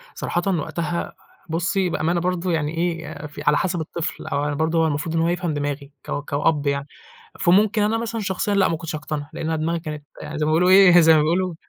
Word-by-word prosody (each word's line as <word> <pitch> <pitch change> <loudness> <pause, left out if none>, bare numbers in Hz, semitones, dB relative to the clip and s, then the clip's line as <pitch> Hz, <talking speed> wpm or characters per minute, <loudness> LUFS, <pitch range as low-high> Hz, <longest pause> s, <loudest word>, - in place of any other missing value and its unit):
صراحةً 175 - -2 0.2
وقتها، 170 +2 -3 0.4
بُصّي 180 +3 0
بأمانة 170 +1 0
برضه 180 +1 -1
يعني 160 0 -1
إيه 170 -1 -1
يا 150 -1 -7
في 145 0 -10
على 150 0 +5
حسب 175 -2 -1
الطفل 160 +1 -5
أو 140 - -1
أنا 150 - -1
برضه 160 +2 +1
هو 160 - +3
المفروض 150 +2 -2
إن 165 - +2
هو 165 - +2
يفهم 175 -2 -1
دماغي 145 -1 -4
ك - - -9 0.2
كأب 145 0 +1
يعني، 140 0 -1 0.5
فممكن 205 +4 +4
أنا 215 +2 +1
مثلًا 230 0 -3
شخصيًا 200 0 -1
لأ، 200 -1 +4
ما 165 - -1
كنتش 160 0 -5
هاقتنع، 150 -1 -5
لإن - - -5
انا 160 0 0
دماغي 165 +2 -1
كانت 150 -2 -7 0.3
زي 150 - 0
ما - - +1
بيقولوا 175 +3 +3
إيه 185 -2 +8
زي 160 -1 +6
ما 155 - +5
بيقولوا 175 +3 0
165 Hz, 220 wpm, -22 LUFS, 150-180 Hz, 0.5 s, إيه